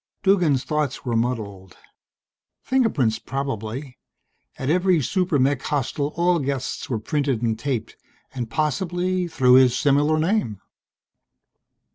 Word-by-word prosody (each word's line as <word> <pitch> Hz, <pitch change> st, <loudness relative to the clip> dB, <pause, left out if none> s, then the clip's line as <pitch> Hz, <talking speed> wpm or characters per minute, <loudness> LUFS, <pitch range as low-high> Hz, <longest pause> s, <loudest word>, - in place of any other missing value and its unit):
Duggan's 175 Hz, -9 st, +3 dB
thoughts 150 Hz, -4 st, -2 dB
were 120 Hz, -2 st, -1 dB
muddled. 105 Hz, -6 st, -3 dB, 0.9 s
Fingerprints 150 Hz, -, +1 dB
probably; 130 Hz, -1 st, -5 dB, 0.6 s
at 130 Hz, -, -4 dB
every 180 Hz, +2 st, +3 dB
super 180 Hz, +2 st, 0 dB
mech 135 Hz, 0 st, +1 dB
hostel 145 Hz, +1 st, -2 dB
all 175 Hz, 0 st, +2 dB
guests 135 Hz, -2 st, -3 dB
were 120 Hz, -, 0 dB
printed 135 Hz, 0 st, -1 dB
and 110 Hz, -1 st, 0 dB
taped, 125 Hz, -4 st, -3 dB, 0.4 s
and 120 Hz, -3 st, -4 dB
possibly 175 Hz, +6 st, -1 dB
through 130 Hz, -6 st, +3 dB
his 125 Hz, -1 st, +6 dB
similar 145 Hz, +2 st, +2 dB
name. 155 Hz, -, 0 dB
140 Hz, 115 wpm, -23 LUFS, 125-165 Hz, 0.9 s, his